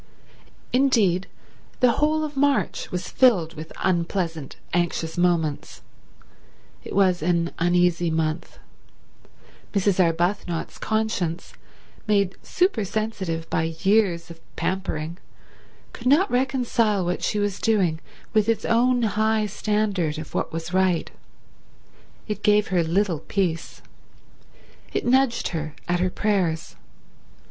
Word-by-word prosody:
Indeed, 225 -9 +3 0.5
the 250 -1 +5
whole 305 +5 +1
of 300 -1 -5
March 280 0 +1
was 180 0 -3
filled 190 -11 +3
with 155 0 -9
unpleasant, 170 -4 -1 0.2
anxious 165 -2 -1
moments. 170 -4 0 1.0
It - - -7
was 185 -3 +3
an 170 +1 +1
uneasy 175 0 +2
month. 160 +1 -2 1.2
Mrs. 195 -1 +3
Arbuthnot's 170 +1 -1
conscience, 215 -6 -2 0.5
made 200 -3 +2
super 365 - +1
sensitive 190 -6 -3
by 160 0 0
years 190 -5 +2
of 165 - -12 0.2
pampering, 170 -3 -3 0.7
could 245 - -5
not 310 +9 +4
reconcile 245 -6 +1
what 175 +1 -2
she - - -1
was 205 -2 -1
doing 190 -8 +1 0.3
with 215 -1 +3
its 225 -2 0
own 245 +1 +3
high 220 0 +1
standard 205 -6 -1
of 155 -1 -8
what - - -2
was 165 +2 -5
right. 185 -2 +1 1.2
It 210 - -4
gave 210 0 +3
her 180 -2 +2
little 175 0 +1
peace. 165 +1 -2 1.1
It - - -1
nudged 260 0 +2
her 155 -3 -4
at 175 0 +1
her 185 +1 +1
prayers. 180 -5 -1
185 Hz, 115 wpm, -24 LUFS, 170-220 Hz, 1.2 s, the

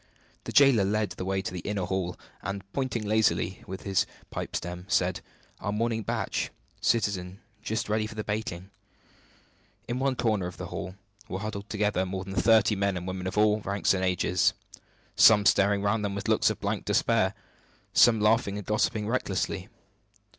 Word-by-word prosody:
The - - -4
jailer 135 -7 +6
led 105 0 0
the 90 +1 -5
way 95 0 -1
to 90 - -4
an 90 - -4
inner 100 -3 -2
hall; 95 -1 -2 0.2
and, 100 -1 -4
pointing 130 -5 -2
lazily 100 -4 +1
with 95 +1 -7
his 95 -2 +1 0.2
pipe - - -5
stem, 90 +1 -4
said: 90 -1 +1 0.4
"Our 100 - -3
morning 115 +1 0
batch, - - -2 0.3
citizen, 100 -4 0 0.2
just 110 -1 -2
ready 110 0 0
for 110 - -10
the 110 - -3
baking." 100 -3 -4 1.2
In 120 +1 -2
one 135 -1 +1
corner 110 -7 0
of 90 - -9
the - - -5
hall 95 - -5 0.3
were 95 - -3
huddled 105 0 -5
together 105 -3 0
more 95 0 -4
than 95 0 -7
thirty 110 0 +4
men 100 -1 0
and 90 - -5
women 95 0 -4
of 95 - -4
all 105 0 +4
ranks 100 -1 +1
and 95 -1 -1
ages; 90 -1 +2 0.6
some 105 -2 +7
staring 100 0 +4
round 105 +1 +1
them 100 -1 -2
with 100 - -4
looks - - +3
of - - -4
blank - - -2
despair; 95 +3 +2 0.6
some 115 -2 +6
laughing 105 -1 +2
and 105 - -6
gossiping 105 0 0
recklessly. 125 +3 -1
100 Hz, 175 wpm, -28 LUFS, 95-110 Hz, 1.2 s, some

